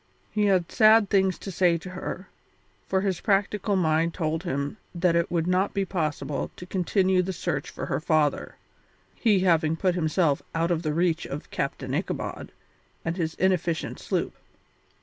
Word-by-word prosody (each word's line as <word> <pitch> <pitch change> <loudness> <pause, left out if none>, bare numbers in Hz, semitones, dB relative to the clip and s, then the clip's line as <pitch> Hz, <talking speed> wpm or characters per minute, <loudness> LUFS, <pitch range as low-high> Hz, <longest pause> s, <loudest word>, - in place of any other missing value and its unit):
He 210 -1 +1
had 185 -4 +2
sad 215 -2 +5
things 190 -2 +3
to 195 - -7
say 175 -1 +3
to 185 +3 -9
her, 185 +1 -6 0.6
for 190 - +1
his 190 -3 -1
practical 200 0 +1
mind 165 -2 +1
told 160 -2 -1
him 140 +6 -3 0.2
that 170 0 +2
it 170 0 +1
would 165 -2 0
not 185 +3 +1
be 195 -1 +1
possible 150 -6 -2
to 180 - -9
continue 185 0 +2
the 185 +1 -3
search 170 -5 -3
for - - -6
her - - -1
father, 155 -2 +1 0.6
he 210 -5 +2
having 160 -3 +3
put 185 +2 +1
himself 160 -3 +1
out 165 +1 +1
of 165 -2 +1
the 155 -3 -2
reach 170 -1 +1
of 145 +2 -7
Captain - - -3
Ichabod - - -3 0.5
and 165 +1 -1
his 165 -3 -2
inefficient 175 -3 0
sloop. - - -2
175 Hz, 170 wpm, -26 LUFS, 160-190 Hz, 0.6 s, sad